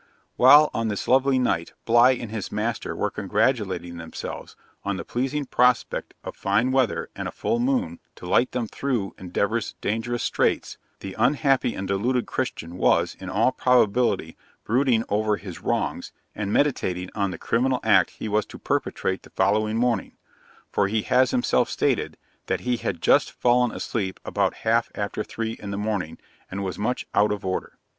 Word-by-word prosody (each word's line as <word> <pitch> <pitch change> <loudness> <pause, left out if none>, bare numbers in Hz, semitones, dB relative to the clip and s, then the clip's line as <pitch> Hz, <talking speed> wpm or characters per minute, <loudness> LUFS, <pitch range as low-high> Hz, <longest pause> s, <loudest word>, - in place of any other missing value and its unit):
While, 145 +4 +7
on 115 0 -1
this 105 -2 -3
lovely 135 +1 +4
night, 85 -10 0
Bligh 120 +2 +5
and 115 -3 -7
his 110 -3 -5
master - - -2
were - - -1
congratulating 95 -9 -1
themselves 80 -1 -7 0.3
on 100 -1 -2
the - - -6
pleasing 135 +4 -2
prospect 125 -1 +1
of - - -7
fine 105 +6 +1
weather 130 -4 0
and - - -4
a - - -5
full 235 - -1
moon, 250 0 0 0.2
to - - -11
light 120 +8 +2
them 125 -2 -2
through 115 -4 -2
Endeavour's 100 +5 -1
dangerous 115 +3 -2
straits, - - 0 0.2
the 95 - -6
unhappy 135 -4 +2
and 95 - -4
deluded 115 +6 0
Christian 90 -9 -4
was, - - +2
in - - -7
all - - +2
probability, 125 -1 +2 0.3
brooding 120 -1 +2
over 105 0 +1
his 95 -4 -9
wrongs, - - -2 0.2
and 100 -1 -3
meditating 95 -10 0
on 100 -2 0
the 95 - -6
criminal 125 +2 +1
act - - +4
he - - -5
was 105 0 0
to - - -10
perpetrate 95 0 -2
the - - -16
following 105 +3 +1
morning; 120 0 0 0.6
for 100 - +2
he 110 +1 0
has 130 0 +3
himself 125 - +1
stated, - - 0 0.3
that - - -1
he 125 -1 0
had 90 -6 -4
just - - +4
fallen 125 -1 +2
asleep 95 -5 -3
about - - 0
half 115 +1 +2
after 105 +1 -3
three 115 +1 -4
in 100 - -6
the 100 - -3
morning, 100 -6 -2 0.3
and 100 +1 -4
was 95 0 -4
much 125 +4 -1
out 105 +1 +3
of 105 -2 -4
order. 95 0 -3
115 Hz, 170 wpm, -24 LUFS, 100-125 Hz, 0.6 s, While